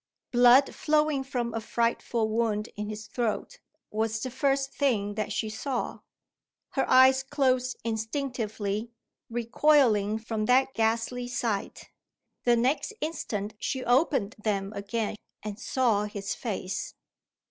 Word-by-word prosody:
Blood 245 +2 +6
flowing 300 -2 +1
from 245 -4 -3
a 225 - -2
frightful 230 0 0
wound 220 -1 0
in 210 0 -4
his 215 0 -6
throat, 240 - -3 0.3
was 220 +1 -1
the 255 +3 -4
first 275 +1 0
thing 215 -8 +1
that 210 0 -3
she 220 +1 -1
saw. 240 +4 -3 0.7
Her 270 - -1
eyes 260 +1 +7
closed 255 -2 +1
instinctively, 220 -2 -2 0.4
recoiling 235 -3 +3
from 220 -1 -3
that 265 +3 +3
ghastly 230 +2 0
sight. 230 -4 -3 0.5
The 240 -1 +5
next 260 - +1
instant 220 -10 -3
she 260 -1 -2
opened 245 -4 +2
them 200 -1 -1
again, 210 +2 -3 0.3
and 210 0 -5
saw 235 -5 +1
his 205 -1 -4
face. 195 -4 -4
235 Hz, 125 wpm, -28 LUFS, 215-260 Hz, 0.7 s, eyes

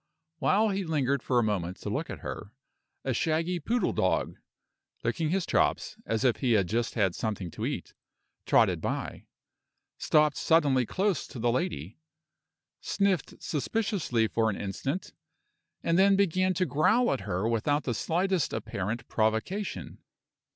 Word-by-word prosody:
While 205 +10 +3
he 195 0 -1
lingered 140 -5 0
for 125 - 0
a 120 - +4
moment 95 -4 -1
to - - -4
look - - -2
at - - -7
her, 100 - -6 0.5
a 130 - 0
shaggy 165 +6 0
poodle 235 +10 0
dog - - 0 0.7
(licking 160 -3 0
his 185 +1 0
chops, - - +1
as 110 +2 0
if 125 -3 +3
he 125 -4 +1
had 100 -4 +3
just 115 +4 -1
had 95 -6 +2
something 100 -5 -3
to - - -3
eat) - - -5 0.5
trotted - - +4
by, - - -4 0.7
stopped 150 -2 +3
suddenly 140 -7 +3
close 195 -3 0
to - - -10
the 120 +1 +1
lady, 90 - -3 0.8
sniffed 195 -6 0
suspiciously 160 - 0
for 110 0 +1
an 100 - -2
instant, 135 - -4 0.7
and 165 +2 +2
then 195 +1 +6
began 185 -1 +2
to 185 +2 +1
growl 220 +12 +3
at - - -2
her 95 +1 -1
without 145 +6 +1
the 125 - -1
slightest 180 - 0
apparent 110 +1 -3
provocation. 110 - -1
140 Hz, 150 wpm, -28 LUFS, 110-185 Hz, 0.8 s, then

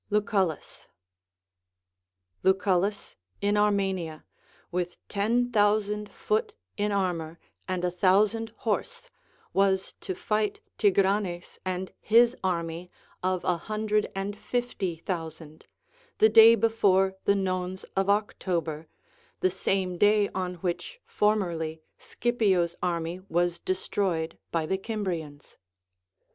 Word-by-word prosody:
LucuLLUs. 200 -6 -1 1.5
Lucullus 190 +1 +1 0.2
in 205 +1 +1
Armenia, 195 -6 0 0.5
Avith 180 0 -2
ten 235 +5 +1
thousand 210 -1 +2
foot 435 - -1 0.2
in 210 -1 0
armor 175 -5 -1 0.3
and 185 -1 -1
a 180 - 0
thousand 205 +5 +2 0.2
horse, 475 - -2 0.4
was 195 -1 +2
to 185 - -4
fight 210 +2 -1 0.2
Tigranes 195 -3 +1
and 185 0 -3
his 235 +3 +5
army 170 -1 -2 0.3
of 185 -1 0
a 180 - +1
hundred 215 +3 -1
and 195 +1 -3
fifty 210 -6 -2
thousand, 160 -2 -6 0.5
the 220 - +6
day 225 +1 +9
before 195 -5 +3
the 200 - +4
nones 185 -1 -2
of 195 0 +1
October, 170 -6 -1 0.5
the 185 - +3
same 185 -1 -1
day 205 0 +4
on 180 -1 -3
which 180 0 -3
formerly 170 -7 0 0.2
Scipio's 195 -8 +1
army 170 0 -2
was 175 0 +1
destroyed 185 -3 -2
by 165 -2 0
the 190 +4 -1
Cimbrians. 175 -9 -5
190 Hz, 105 wpm, -27 LUFS, 175-210 Hz, 1.5 s, day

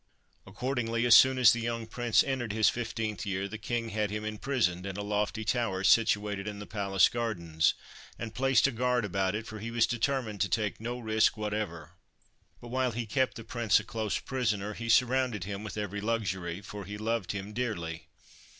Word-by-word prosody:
Accordingly, 115 +2 -1
as 120 - +6
soon 130 +3 +8
as 125 -3 +7
the 120 - -2
young 115 0 -2
Prince 120 0 +2
entered 125 -6 -2
his 110 0 +4
fifteenth 115 -3 -3
year, 100 -2 -2
the 110 +2 -7
King 115 +1 -2
had 105 -1 -1
him 105 +1 -4
imprisoned 110 -5 -1
in 95 0 -5
a 100 - -3
lofty 105 +1 -1
tower 110 -5 0
situated 105 -2 +3
in 105 -1 -5
the 105 - -7
palace 100 -1 +3
gardens, 85 -10 0 0.4
and 115 -1 -6
placed 135 -1 +3
a 140 - +3
guard 125 -1 +1
about 95 0 0
it, 110 +1 -4
for 110 -1 -8
he 115 +3 -5
was 115 -1 +3
determined 120 -3 -1
to 100 - +2
take 105 +3 -1
no 120 +2 -3
risk 110 -2 +2
whatever. 105 -5 -4 0.7
But, 120 - -11
while 130 -1 0
he 120 +1 -3
kept 130 +5 0
the 115 - -8
Prince 115 -2 +2
a - - -7
close 110 -1 -2
prisoner, 105 -6 -2
he 115 +2 -6
surrounded 125 -3 +3
him 100 +2 -5
with 110 - -6
every 105 -1 -3
luxury, 95 -5 -2
for 105 0 -8
he 105 +2 -6
loved 110 -1 -1
him 100 +1 -6
dearly. 85 -9 -3
110 Hz, 195 wpm, -30 LUFS, 100-120 Hz, 0.7 s, soon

